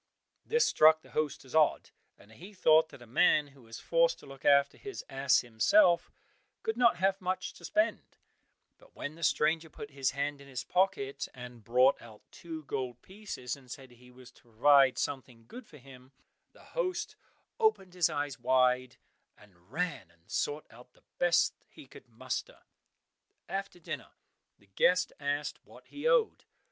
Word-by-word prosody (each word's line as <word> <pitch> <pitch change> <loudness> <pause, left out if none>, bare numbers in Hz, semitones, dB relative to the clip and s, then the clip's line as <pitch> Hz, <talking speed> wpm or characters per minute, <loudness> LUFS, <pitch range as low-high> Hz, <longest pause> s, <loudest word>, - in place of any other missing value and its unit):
This 470 +1 +2
struck 155 0 +5
the - - -18
host 150 -3 -2
as 130 - -14
odd, 155 -1 +2 0.3
and 105 - -20
he 185 - -13
thought 160 -3 +4
that 120 - -13
a - - -13
man 145 +5 +3
who 135 -1 -20
was 115 -1 -10
forced - - +2
to - - -16
look 135 -1 -13
after 140 0 +4
his 405 -1 -8
ass 135 0 +3
himself, 170 - +3 0.5
could 445 -1 -1
not 235 -1 +4
have 195 +2 +1
much 185 0 -3
to - - -17
spend; 215 +2 -1 0.6
but - - -22
when 145 - -5
the 165 - -15
stranger 160 0 +1
put 145 -1 -10
his 135 -1 0
hand 140 0 -3
in 140 - -14
his 130 -2 -5
pocket 405 - 0
and 125 -2 -10
brought 125 +5 +3
out 110 -3 -14
two 160 -2 -8
gold 130 -3 -4
pieces, 190 - -6
and 135 -3 -19
said 130 0 -10
he 125 +1 -18
was 125 0 -15
to - - -23
provide 135 +3 +4
something 125 -5 -5
good 245 -2 -11
for 150 - -15
him, 130 -1 -16 0.4
the - - -19
host 370 -8 -2 0.4
opened 435 - +1
his 180 -3 +2
eyes 145 -3 -3
wide, 125 0 +2 0.4
and 90 -3 -22
ran 160 - -3
and 85 0 -24
sought 145 +1 -2
out 125 +2 -17
the - - -27 0.2
best 175 -1 +3 0.2
he - - -14
could 130 - -16
muster. 130 +3 -6 0.8
After 195 -1 -5
dinner 155 -5 -7 0.4
the - - -26
guest 175 - +2
asked 145 +1 -3
what - - -17
he - - -4
owed. 480 -2 +2
140 Hz, 175 wpm, -31 LUFS, 125-180 Hz, 0.8 s, struck